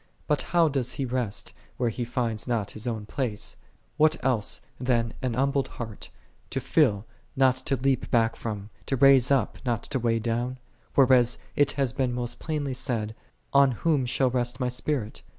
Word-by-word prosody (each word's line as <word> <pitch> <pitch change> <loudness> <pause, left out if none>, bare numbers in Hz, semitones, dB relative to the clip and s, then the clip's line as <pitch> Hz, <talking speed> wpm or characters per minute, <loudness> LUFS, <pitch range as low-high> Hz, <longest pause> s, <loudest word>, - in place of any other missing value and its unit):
But 150 -2 +1
how 170 -1 +4
doth 135 -4 -1
He 135 - -2
rest, 125 -5 -3 0.2
where 120 -2 +1
He 120 - -3
findeth 115 -2 -2
not 115 -5 -1
His 110 +3 -6
own 110 -3 -3
place? 110 -2 -3 0.4
what 155 0 +5
else 120 -6 +1 0.2
than 120 -2 +1
an 125 -3 -1
humbled 135 +1 +1
heart, 110 -3 -7 0.4
to - - -2
fill, 100 +1 +2 0.3
not 130 -1 +4
to 135 - +2
leap 135 +1 0
back 115 -1 +2
from; 105 -2 -5 0.2
to 135 - +1
raise 135 -1 +6
up, 135 -2 +1
not 120 -4 -1
to 135 - -2
weigh 115 -1 +1
down? 120 +3 -2 0.4
whereas 125 -3 +5 0.2
it 145 -1 +3
hath 135 -3 -1
been 130 -2 +1
most 120 -1 -3
plainly 150 -4 -2
said, 115 -4 -2 0.4
"On 140 -2 +6
whom 140 0 +1
shall 130 0 +2
rest 120 0 -1
My 125 - 0
Spirit 125 -2 -3
125 Hz, 175 wpm, -27 LUFS, 115-135 Hz, 0.4 s, raise